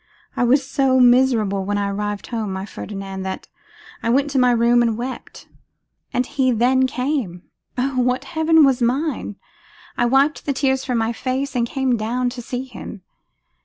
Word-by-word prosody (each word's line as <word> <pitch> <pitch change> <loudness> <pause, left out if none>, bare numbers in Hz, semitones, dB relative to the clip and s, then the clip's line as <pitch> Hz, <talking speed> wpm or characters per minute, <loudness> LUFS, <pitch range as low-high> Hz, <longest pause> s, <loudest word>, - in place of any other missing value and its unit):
I - - +1
was 265 +3 +3
so 270 -2 +2
miserable 240 -6 +3
when 205 +1 -1
I 200 0 0
arrived 205 0 -3
home, 220 -4 -4
my 190 +1 -4
Ferdinand, 195 -2 -7
that 190 0 -5 0.5
I 230 - -1
went 280 +4 +2
to 270 - +1
my 250 0 +4
room 240 0 +4
and 230 -2 +1
wept. 250 +2 -7 0.6
And 250 - 0
he 265 -1 0
then 255 +3 +3
came! 250 - -3 0.3
Oh! 255 0 0
what 250 +1 0
heaven 320 -2 +3
was 265 -2 +2
mine! 255 -2 -1 0.6
I 240 - +2
wiped 275 +6 +2
the 280 - +1
tears 265 -1 0
from 250 -3 -1
my 225 +1 0
face 260 +3 -3
and 235 -1 +1
came 265 -3 0
down 245 +3 -1
to 245 0 -7
see 245 +2 -4
him. 220 -6 -10
250 Hz, 175 wpm, -21 LUFS, 225-265 Hz, 0.6 s, my